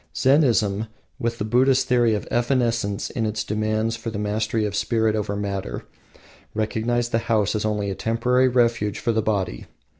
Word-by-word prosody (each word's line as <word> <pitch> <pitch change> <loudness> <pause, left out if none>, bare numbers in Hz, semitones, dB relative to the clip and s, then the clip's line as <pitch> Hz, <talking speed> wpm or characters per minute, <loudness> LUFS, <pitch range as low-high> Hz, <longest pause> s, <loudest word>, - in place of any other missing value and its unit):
Zennism, 115 -7 +3 0.3
with 115 0 -2
the 105 - -2
Buddhist 130 +3 +3
theory 120 -3 +3
of 105 - -5
evanescence 120 -4 0
and 110 -2 -1
its 105 +1 -2
demands 110 +1 -1
for 115 0 -5
the 110 - -5
mastery 105 +1 -1
of 105 -1 -3
spirit 110 +1 +1
over 105 -1 -2
matter, 100 -2 -4 0.7
recognized 115 +2 -1
the 115 - +2
house 105 -3 +2
only 105 -2 -1
as - - -2
a - - -11
temporary 125 +3 +2
refuge 115 -4 +1
for 115 - 0
the 110 0 +1
body. 100 - -2
110 Hz, 170 wpm, -23 LUFS, 105-120 Hz, 0.7 s, Zennism